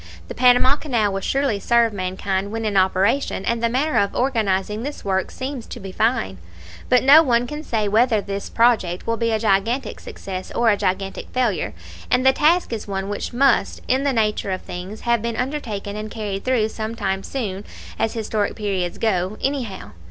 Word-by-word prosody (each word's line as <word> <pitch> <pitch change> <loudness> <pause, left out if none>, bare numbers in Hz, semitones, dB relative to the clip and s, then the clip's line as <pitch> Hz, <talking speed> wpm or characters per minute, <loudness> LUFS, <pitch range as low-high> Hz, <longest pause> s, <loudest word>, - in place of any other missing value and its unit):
The - - -4
Panama 250 +2 +5
Canal 230 -10 0
will 195 - -1
surely 270 -3 0
serve 235 +1 +3
mankind 190 +1 -2
when 225 0 -3
in 210 -2 -1
operation; 195 +4 +2
and 235 0 0
the 235 - +2
manner 285 +6 +1
of 200 - 0
organizing 215 -5 0
this 285 -1 -6
work 190 -1 0
seems 260 -2 -6
to - - -8
be 195 -2 -7
fine. 200 - 0 0.5
But 250 - +4
no 285 +4 +9
one 245 -5 +2
can 295 +4 -6
say 220 -7 -1
whether 220 +2 +3
this 200 0 -5
project 220 -7 +2
will 230 0 -1
be 230 0 0
a 220 - +2
gigantic 215 +4 0
success 195 - -7
or 235 -2 +4
a - - +3
gigantic 195 -1 -2
failure; 235 - 0 0.3
and 250 +1 +2
the 265 - +6
task 320 0 +2
is 220 - -5
one 195 0 -3
which 205 - -4
must, 255 0 +2
in 260 +2 +2
the 280 - +2
nature 215 -4 0
of 185 -1 -3
things, 185 +5 -7
have 235 -2 +1
been 235 0 -2
undertaken 235 -7 -3
and 215 0 -5
carried 205 -3 -4
through 240 -4 +2
some 220 +1 -5
time 195 -3 -1
soon, 200 -5 -4 0.4
as 225 +1 0
historic 215 -2 -1
periods 195 -5 -2
go, 195 -2 0
anyhow. 260 -8 -3
220 Hz, 190 wpm, -21 LUFS, 195-250 Hz, 0.5 s, no